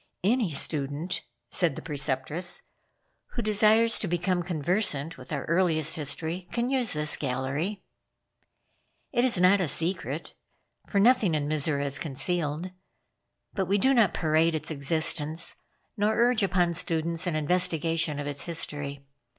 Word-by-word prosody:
"Any 225 0 +2
student," 145 +3 0 0.3
said 170 -6 +1
the - - -7
Preceptress, 150 +3 -1 0.7
"who 235 - -3
desires 215 +2 +3
to 205 - -1
become 175 +1 0
conversant 165 -2 -1
with 130 +3 -13
our 140 -3 -3
earliest 165 -3 +1
history, 160 +4 -3
can 240 +2 -1
use 250 -7 +1
this 150 -1 +1
gallery. 140 +9 -3 1.3
It 240 -2 +1
is 245 -8 +3
not 185 +2 +4
a 180 - 0
secret, 170 +6 0 0.6
for 200 - +1
nothing 210 -6 +4
in 145 -1 -1
Mizora 145 -1 0
is 140 0 0
concealed; 160 +3 -1 0.8
but 190 -3 -2
we 200 +2 +2
do 265 +7 +3
not 230 -8 +4
parade 160 +1 +2
its 155 - -3
existence, 155 +2 +1 0.4
nor 210 +1 +1
urge 240 -1 +3
upon 180 -3 +1
students 165 +1 0
an 170 - -1
investigation 165 -1 +1
of 145 - -4
its 145 -1 -4
history. 145 -4 -4
165 Hz, 140 wpm, -27 LUFS, 150-190 Hz, 1.3 s, not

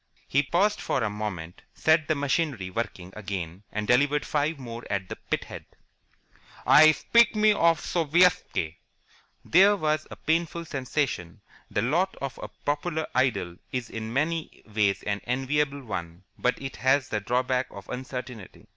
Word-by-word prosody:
He 140 - +3
paused 185 +9 +1
for 130 - 0
a 105 - 0
moment, 95 -6 -5
set 160 -1 +3
the 155 - +2
machinery 140 - -1
working 95 -4 -4
again, 95 -4 -5
and 105 0 -2
delivered 145 +6 +3
five 150 +1 0
more 120 -3 -7
at 95 -2 -2
the - - -4
pithead. - - -5 1.0
"I 155 +1 +8
spit 235 +10 +4
me 215 0 +5
of 165 -4 +3
Sovietski!" 165 - +2 0.7
There 195 +4 +6
was 155 -4 0
a - - -8
painful 170 +1 -1
sensation. 130 - -2 0.3
The - - 0
lot 170 +10 +1
of 140 -1 -6
a - - -5
popular 155 +2 -2
idol 120 -9 0
is 125 -3 -4
in 110 0 -5
many 155 +5 -2
ways 105 -2 0
an 105 0 -2
enviable 140 +2 0
one, 85 -5 -6
but 125 - 0
it 135 -1 -6
has 135 +1 +2
the 105 - -1
drawback 125 +4 0
of 100 - -11
uncertainty. 125 -5 -7
130 Hz, 150 wpm, -27 LUFS, 105-155 Hz, 1.0 s, I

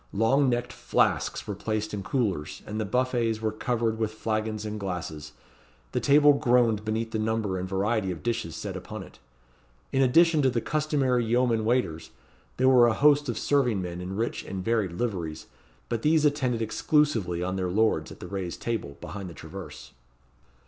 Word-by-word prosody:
Long 130 +6 +3
necked 120 0 -1
flasks - - 0
were 105 - -3
placed 110 +1 -3
in 100 - -3
coolers, 100 - -2
and 110 +1 -4
the - - -1
buffets 120 -1 0
were 110 -1 -1
covered 115 0 -1
with 110 -1 -1
flagons 110 -1 -2
and 105 0 -4
glasses. 80 -6 -5 0.6
The - - 0
table 145 +1 +6
groaned 120 -6 +2
beneath 110 +1 -2
the 110 - -2
number 110 -3 -1
and 90 +1 -4
variety 100 +1 0
of 90 -3 -5
dishes 115 -9 -2
set 80 - -5
upon - - -7
it. - - -16 0.7
In 135 - +2
addition 160 +4 +5
to 135 - +4
the 120 -2 0
customary 135 -3 +1
yeomen 115 -1 +1
waiters, 95 - 0 0.5
there 130 - +3
were 125 -2 +7
a 115 - +2
host 145 +1 +4
of 120 - -2
serving 125 -8 +2
men 90 0 -5
in 95 +2 -5
rich 115 +3 -2
and 95 -1 -6
varied 110 -6 +1
liveries, 85 -7 -3 0.4
but 115 -2 -2
these 155 +2 +3
attended 130 -6 +1
exclusively 110 - +1
on 95 +1 -2
their 95 -1 -1
lords 100 -5 +1
at - - -11
the - - -8
raised 95 -3 -4
table, 110 -12 -3
behind 100 -2 -6
the 85 - -11
traverse. 90 -5 -9
110 Hz, 180 wpm, -27 LUFS, 95-125 Hz, 0.7 s, were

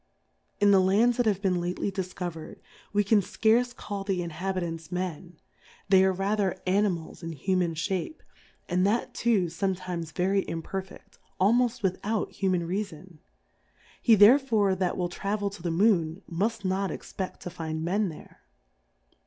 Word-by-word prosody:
In 205 0 +5
the 195 - +6
Lands 210 +6 +3
that 245 -2 +2
have 200 -1 0
been 180 -3 +1
lately 180 +3 -2
difcover'd, 180 -3 -5 0.3
we 205 0 +2
can 205 +1 +4
fcarce 235 +5 +1
call 200 -4 -5
the 190 -3 -1
Inhabitants 170 -1 -4
Men, 180 -2 -4 0.5
they 190 -1 +6
are 190 - +4
rather 195 0 0
Animals 185 -4 0
in 165 -1 -5
Human 175 +2 0
Shape, 190 - -3 0.4
and 180 0 +1
that 225 +4 0
too 225 -6 +2
fometimes 175 -1 -3
very 190 +4 +1
imperfeft, 190 +4 -7 0.2
almoft 235 +4 +2
without 200 +3 -1
^uman 185 -3 0
Rea 195 +5 0
fon; 175 -3 -14 0.8
he 230 - +6
therefore 215 -2 +5
that 185 -1 -1
will 180 - 0
travel 200 +3 -2
to 195 - -11
the 170 - -2
Moon, 170 -1 +2
muft 205 +4 -2
not 190 +1 0
expeft 190 -1 -6
to 180 - -6
find 160 -2 -4
Men 200 +3 +1
there. 155 - -12
190 Hz, 150 wpm, -27 LUFS, 175-205 Hz, 0.8 s, the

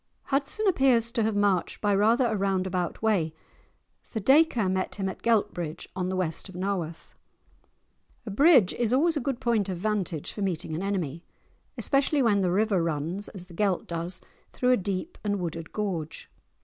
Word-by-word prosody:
Hudson 280 +10 -1
appears 260 -9 +3
to 235 - 0
have 220 -1 +1
marched 200 -4 +1
by 205 -1 +1
rather 225 +6 +3
a 225 -2 0
round 195 -2 0
about 180 +1 -3
way, 175 -8 +1 0.7
for 225 - -6
Dacre 265 -2 +4
met 185 0 -1
him 195 -2 -2
at 190 - -6
Geltbridge, 185 -8 0
on 185 0 -2
the 190 - -2
west 185 +1 -2
of 190 - -11
Nawarth. 180 -4 -4 1.1
A 215 - -5
bridge 260 - +5
is 240 -1 0
always 325 +5 +3
a - - +1
good 265 -1 -2
point 225 -6 +1
of 185 - -3
vantage 185 -5 -2
for 205 - -6
meeting 175 -5 -2
an 160 - -3
enemy, 175 -5 -2 0.5
especially 280 0 +2
when 205 -4 +3
the 185 - +1
river 200 0 +2
runs, 165 +5 -2
as 185 -3 -9
the 180 - -15
Gelt 190 0 0
does, 170 +1 -4 0.3
through 250 0 +2
a - - +6
deep 200 - -4
and 205 -1 -1
wooded 165 -2 -5
gorge. 180 -7 -4
200 Hz, 180 wpm, -27 LUFS, 180-230 Hz, 1.1 s, a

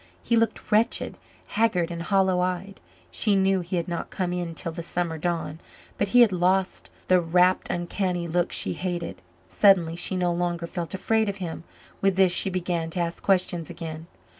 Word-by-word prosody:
He 235 - +1
looked 230 0 0
wretched 215 +2 +2 0.3
haggard 195 -6 +1
and 170 0 -5
hollow 190 0 +2
eyed. 185 +2 -2 0.3
She 210 -3 +2
knew 195 0 +3
he 180 +1 -4
had 170 -2 -1
not 170 -1 -4
come 180 -2 -2
in 175 -2 -3
till 165 - -4
the 170 +1 -6
summer 170 -1 -2
dawn. 165 -2 -2 0.4
But 205 - +2
he 245 +4 +5
had 230 -4 +6
lost 185 +1 +1 0.2
the 185 -1 +5
rapt, 180 +2 +2
uncanny 175 0 -2
look 175 +2 0
she - - +2
hated; 175 -2 -4 0.3
suddenly 180 -5 +4
she 175 +2 -1
no 180 -1 +1
longer 175 -1 -2
felt 170 +1 -5
afraid 220 +2 +1
of 200 - -3
him. 170 -3 -6 0.4
With 195 -1 +2
this, 190 -1 +4
she 185 - +1
began 175 -3 -2
to 170 - -4
ask 170 0 -2
questions 180 -3 +1
again. 165 -1 -7
180 Hz, 185 wpm, -25 LUFS, 170-190 Hz, 0.4 s, had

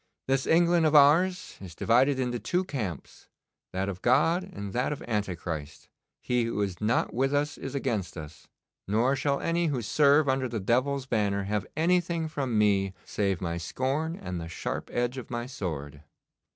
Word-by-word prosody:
'This 135 0 +1
England 170 0 +4
of 155 -1 +3
ours 165 +6 +4
is 90 -3 -9
divided 130 +4 +3
into 125 -2 -1
two 180 +8 0
camps, 110 - -6 0.4
that 95 +1 -2
of 95 -2 -5
God 150 +8 +3
and 100 - -6
that 125 +4 0
of 150 - -5
Antichrist. 85 -9 -4 0.3
He 125 -1 +1
who 115 -2 -3
is 95 -1 -4
not 110 +3 +1
with 135 +4 +1
us 145 +1 0
is 135 +1 -7
against 100 -10 -2
us, 75 0 -10 0.4
nor 115 +7 +2
shall 140 0 0
any 170 0 0
who 130 -6 -1
serve 145 +5 +4
under 130 -1 +1
the 115 -2 -3
devil's 130 +7 +1
banner 100 -5 0
have 105 0 -2
anything 170 0 +1
from 135 -7 -2
me 100 -2 +2
save 100 -4 -1
my 85 -2 -2
scorn 135 - -2
and 90 - -5
the 80 - -6
sharp - - -4
edge 120 +2 -1
of 125 - -10
my 120 0 -3
sword. 75 - -5
125 Hz, 175 wpm, -28 LUFS, 100-145 Hz, 0.4 s, England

